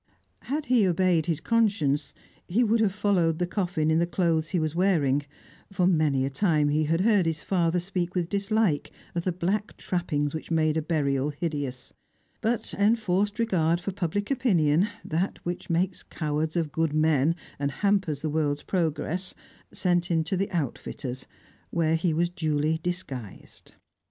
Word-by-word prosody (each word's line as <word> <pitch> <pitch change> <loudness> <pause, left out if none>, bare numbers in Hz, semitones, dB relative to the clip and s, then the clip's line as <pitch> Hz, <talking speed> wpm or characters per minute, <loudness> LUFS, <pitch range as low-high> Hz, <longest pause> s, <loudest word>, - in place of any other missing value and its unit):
Had 295 +3 -2
he 240 -7 +4
obeyed 175 -2 +2
his 165 -3 0
conscience, 180 -12 +1 0.3
he 215 +8 +2
would 230 0 +2
have 215 -3 +3
followed 185 -5 +1
the 180 - 0
coffin 175 -4 0
in 160 - +3
the 170 - +1
clothes 165 -3 +1
he 185 - 0
was 155 -1 -1
wearing, 160 -7 +2 0.5
for 185 -2 +1
many 155 -7 +2
a - - -1
time 150 -1 +2
he 155 +1 +2
had 165 +3 +1
heard 205 -4 +3
his 160 -1 -2
father 175 -2 +1
speak 180 0 -3
with 175 -2 0
dislike 200 -4 0 0.2
of 170 0 -3
the 185 - +2
black 190 +5 -2
trappings 150 -5 -1
which 160 - -6
made 155 -2 +2
a 160 - +1
burial 145 -3 0
hideous; 145 -4 -4 0.5
but 230 0 -1
enforced 205 -1 +1
regard 175 -8 +2
for 195 - -4
public 205 - -2
opinion, 185 - +3 0.2
that 170 +5 -1
which 175 0 -5
makes 180 +2 0
cowards 155 0 -2
of 165 -4 0
good 160 -1 0
men 155 0 +3 0.2
and 140 0 0
hampers 190 -4 0
the 155 - 0
world's 145 -2 0
progress, 180 +1 -2 0.4
sent 175 -2 +1
him 165 -2 +2
to 165 +4 -1
the 195 +3 -1
outfitter's, 135 -5 -4 0.4
where 165 -1 +1
he 165 +1 +1
was 170 +2 +1
duly 155 -2 0
disguised. 145 - -6
170 Hz, 165 wpm, -27 LUFS, 155-190 Hz, 0.5 s, he